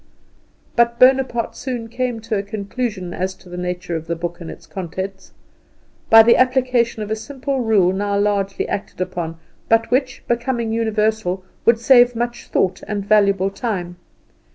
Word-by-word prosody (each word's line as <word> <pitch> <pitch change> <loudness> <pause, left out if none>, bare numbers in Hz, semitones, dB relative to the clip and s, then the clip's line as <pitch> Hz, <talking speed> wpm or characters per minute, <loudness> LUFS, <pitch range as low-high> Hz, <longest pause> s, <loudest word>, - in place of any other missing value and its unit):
But 235 0 +3
Bonaparte 255 -2 +3
soon 245 -3 -4
came 245 -1 -3
to 225 0 -3
a 200 - 0
conclusion 200 -2 -4
as 190 +1 -3
to 180 - -18
the 175 - -8
nature 180 -1 -4
of 160 0 -5
the 170 - -1
book 175 +1 -5
and 165 - -7
its - - -11
contents, 190 +1 -6 0.8
by 225 0 +9
the 235 +1 +5
application 250 -3 +2
of 210 - -7
a - - +1
simple 270 +4 -4
rule 210 -6 +3
now 200 +1 -1
largely 200 -1 0
acted 200 - -5
upon, 175 -3 -3 0.3
but 225 +1 +3
which, 255 0 0
becoming 235 -1 -1
universal, 220 -4 0 0.2
would 230 0 +5
save 245 0 +5
much 240 +1 -3
thought 185 -1 0
and 205 -2 -3
valuable 200 -2 +3
time. 185 -6 -4
220 Hz, 160 wpm, -20 LUFS, 190-240 Hz, 0.8 s, by